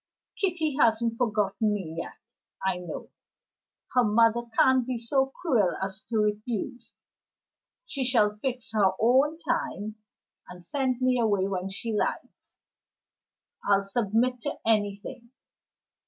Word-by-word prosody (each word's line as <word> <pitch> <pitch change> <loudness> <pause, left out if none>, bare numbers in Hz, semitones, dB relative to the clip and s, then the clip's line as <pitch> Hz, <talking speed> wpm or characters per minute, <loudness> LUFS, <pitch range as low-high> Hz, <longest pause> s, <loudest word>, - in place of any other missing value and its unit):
Kitty 325 -7 0
hasn't 230 -1 +3
forgotten 210 -2 +1
me 175 -6 -5
yet, - - -6 0.5
I 190 -1 +1
know. 180 -1 -7 0.8
Her 250 - +5
mother 230 +2 +4 0.2
can't 260 -1 +5
be 255 -2 -1
so 265 +4 +1
cruel 265 - +1
as 190 +1 -4
to 230 - 0
refuse. 215 +3 -2 0.9
She 275 - -3
shall 220 -5 +3
fix 250 +1 -4
her 200 -4 +3
own 265 +7 +4
time, 215 - -3 0.5
and 180 -1 -11
send 260 +1 -1
me 255 -1 +3
away 205 -4 +2
when 190 -1 -3
she 220 +4 -4
likes; 210 - -3 1.1
I'll 200 -1 +3
submit 230 +4 0
to - - -3
anything. 220 +3 -1
225 Hz, 125 wpm, -27 LUFS, 205-255 Hz, 1.1 s, Her